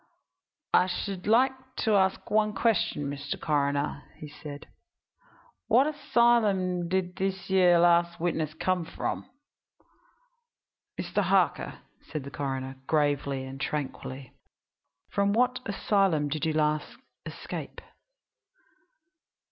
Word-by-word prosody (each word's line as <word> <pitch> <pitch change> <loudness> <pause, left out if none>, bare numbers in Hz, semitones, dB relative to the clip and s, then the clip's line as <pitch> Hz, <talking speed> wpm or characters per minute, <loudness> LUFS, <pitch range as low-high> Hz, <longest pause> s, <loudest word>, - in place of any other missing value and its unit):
"I 180 - +5
should 185 +1 -4
like 250 +5 +4 0.3
to 220 - +1
ask 190 -1 +1
one 215 0 +2
question, 195 -9 +1
Mr. 140 0 -4
Coroner," 145 -1 0
he 155 - -8
said. 145 -1 -9 1.0
"What 270 - +5
asylum 225 - +2
did 180 0 -1
this 190 0 -3
yer 180 -2 +5
last 170 0 +3
witness 165 -2 0
escape 180 +1 -1
from?" - - -4 1.7
"Mr. - - 0
Harker," - - +1 0.2
said 155 -3 -6
the 140 - -8
coroner, 135 -2 -4
gravely 145 -3 +1
and 135 +1 -8
tranquilly, 135 -3 -4 0.8
"from 200 0 +2
what 250 +2 +2
asylum 195 -7 +1
did 155 +2 -1
you 160 - 0
last 150 -1 0 0.3
escape?" - - -7
175 Hz, 110 wpm, -28 LUFS, 145-200 Hz, 1.7 s, I